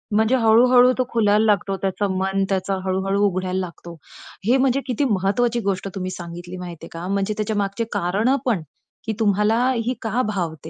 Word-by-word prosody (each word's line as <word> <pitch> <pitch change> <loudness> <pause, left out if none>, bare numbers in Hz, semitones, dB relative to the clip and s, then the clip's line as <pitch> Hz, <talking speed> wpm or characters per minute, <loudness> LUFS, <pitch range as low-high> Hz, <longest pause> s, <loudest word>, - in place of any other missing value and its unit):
म्हणजे 220 +4 +3
हळू-हळू 245 +3 +6
तो 255 - +2
खुलायला 215 -1 +3
लागतो, 200 -2 +1
त्याचं 195 +1 -1
मन 195 +1 0
त्याचा 195 0 0
हळू-हळू 195 +2 0
उघडायला 185 -1 -1
लागतो. 170 -1 -7 0.5
हे 250 +4 +4
म्हणजे 270 +1 +2
किती 255 +3 0
महत्त्वाची 215 +5 +1
गोष्ट 195 0 -1
तुम्ही 185 -1 -3
सांगितली 175 0 -8
माहितीये 170 -2 -8
का. 170 +2 -6
म्हणजे 200 +2 0
त्याच्यामागची 205 0 -1
कारणं 210 +10 +1
पण, 220 -9 +1 0.4
की 220 - -1
तुम्हाला 210 +1 +2 0.3
ही 250 - 0
का 225 +3 0
भावते 165 -6 -4
200 Hz, 165 wpm, -22 LUFS, 185-225 Hz, 0.5 s, हळू-हळू